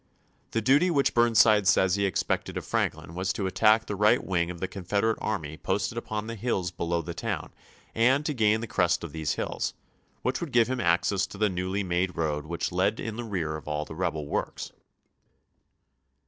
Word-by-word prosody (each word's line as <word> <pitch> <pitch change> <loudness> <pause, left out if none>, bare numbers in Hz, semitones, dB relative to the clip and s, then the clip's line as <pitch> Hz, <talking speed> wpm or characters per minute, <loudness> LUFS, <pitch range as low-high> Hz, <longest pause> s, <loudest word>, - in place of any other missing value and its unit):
The 115 - -1
duty 145 +9 +4
which 140 -5 +2
Bm 120 0 +3
nside 105 -3 +5
says 95 -1 +4
he 100 0 +2
expected 90 - -1
of - - -5
Franklin 80 - -2
was 95 +2 -1
to 95 - -3
at 95 - -2
tack 110 +2 +4
the 105 - -4
right 105 +5 +3
wing 85 -2 0
of 90 -1 -6
the 95 - -2
Confederate 100 +4 -1
army 80 -8 -3
posted 95 +5 -1
upon 110 -2 -4
the 115 - -5
hills 100 -6 -2
below 85 -1 -2
the - - -5
town - - -4 0.4
and 130 +6 +3
to 155 - 0
gain 110 -3 +2
the - - -3
crest 90 -5 +1
of 85 - -6
these 80 -1 -2
hills, - - -3 0.5
which 130 +6 -1
would 170 -5 -4
give 120 -1 +5
him 130 0 -1
access 90 +2 +2
to - - -11
the 105 0 +2
newly 95 +2 -2
made 90 0 -1
road 75 -2 -1
which 85 +2 -2
led 90 +5 +1
in 110 -1 -4
the 120 - -4
rear 90 -8 -2
of 75 - -9
all 75 0 -2
the - - -9
rebel 80 -3 -2
works. 75 - -3
95 Hz, 205 wpm, -27 LUFS, 85-110 Hz, 0.5 s, nside